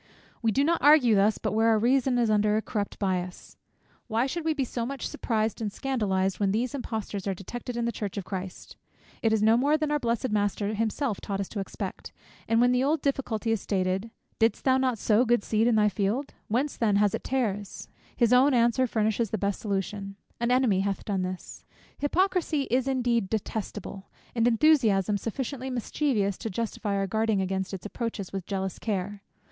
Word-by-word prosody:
We 225 -2 +2
do 275 +6 +2
not 335 +3 +1
argue 285 -6 +6
thus 205 +1 +3
but - - -2
where 225 +1 +2
our 225 -1 +5
reason 250 +3 +2
is 235 -3 +2
under 210 0 +3
a - - +1
corrupt 205 -2 -3
bias. 185 -2 -3 0.5
Why 230 +1 +1
should 335 +5 -3
we 320 -1 0
be 280 - 0
so 240 -1 -3
much 270 +3 -4
surprised 220 -1 -1
and 210 -2 -2
scandalized, 195 -7 -1
when 200 -2 +2
these 235 +6 -1
importers 220 -7 -4
are 195 - 0
detected 240 +6 -6
in 235 - 0
the 235 - 0
church 205 -2 -5
of 195 - -3
Christ? 185 -1 -7 0.4
It 225 - +2
is 220 -1 +2
no 220 +1 +5
more 290 +5 +3
than 305 -1 -1
our 295 - +2
blessed 235 -1 -1
Master 205 0 0
himself 225 +1 -1
taught 195 -1 -3
us 195 - -2
to 210 - -5
expect; 195 - -6 0.4
and 225 0 +3
when 245 +1 +5
the 250 +1 +2
old 300 +2 +1
difficulty 245 -5 -1
is 225 -3 0
stated, 190 +2 -1 0.3
"didst 225 0 +2
thou 260 -1 +4
not 255 -3 +1
sow 215 +3 +3
good 240 -3 +2
seed 220 +1 +1
in 240 - +3
thy 210 -1 +4
field, 210 +7 -1
whence 260 +7 -1
then 215 -3 +2
hath 205 0 +3
it - - -3
tares?" 210 -6 -2 0.3
his 240 -1 +4
own 260 +2 +5
answer 240 +2 +3
furnishes 220 0 0
the 220 - -1
best 200 0 -1
solution, 195 -1 -3 0.2
"an 235 0 0
enemy 250 -6 +3
hath 195 0 -2
done 195 -3 -1
this." 185 0 -6 0.4
Hypocrisy 330 -1 +1
is 255 +1 +2
indeed 240 -6 +1
detestable, 210 -2 -4 0.2
and 230 -1 +2
enthusiasm 225 - +3
sufficiently 260 +4 -4
mischievous 240 -5 -1
to 225 - -4
justify 210 0 -3
our 195 0 0
guarding 220 +1 +1
against 190 0 -2
its 195 -1 -7
approaches 210 -3 -4
with 190 -2 -5
jealous 190 -2 -3
care. 200 -1 -3
220 Hz, 195 wpm, -27 LUFS, 200-250 Hz, 0.5 s, argue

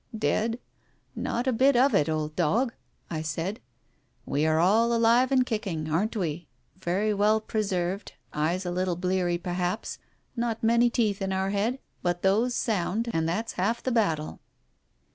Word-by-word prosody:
" - - -4
Dead? 225 +2 0 0.6
Not 240 +2 -2
a 260 - +2
bit 265 +4 +4
of 260 +3 +4
it, 150 +1 +3
old 155 -1 -2
dog! 235 - +1 0.2
" - - -28
I 155 -2 -2
said. 165 +7 -3 0.7
"We 150 +2 0
are 155 0 +3
all 220 +7 +4
alive 235 +3 +4
and 255 -2 +4
kicking, 185 -10 -3
aren't 205 +9 0
we? 170 -3 -3 0.3
Very 195 +4 0
well 210 +2 +3
pre 220 0 -2
served, 190 -1 -2 0.2
eyes 170 +5 0
a 175 - -2
little 180 0 0
bleary 180 -1 0
perhaps, 180 +3 -3 0.4
not 235 -2 -2
many 235 +1 +4
teeth 215 -5 0
in 190 0 -1
our 190 +1 0
head, 215 +6 0 0.2
but 175 0 -1
those 220 +6 +2
sound, 220 +2 0
and 165 0 0
that's 220 +7 -2
half 225 +6 -1
the 260 - -1
battle." 165 -10 0
195 Hz, 170 wpm, -27 LUFS, 175-230 Hz, 0.7 s, bit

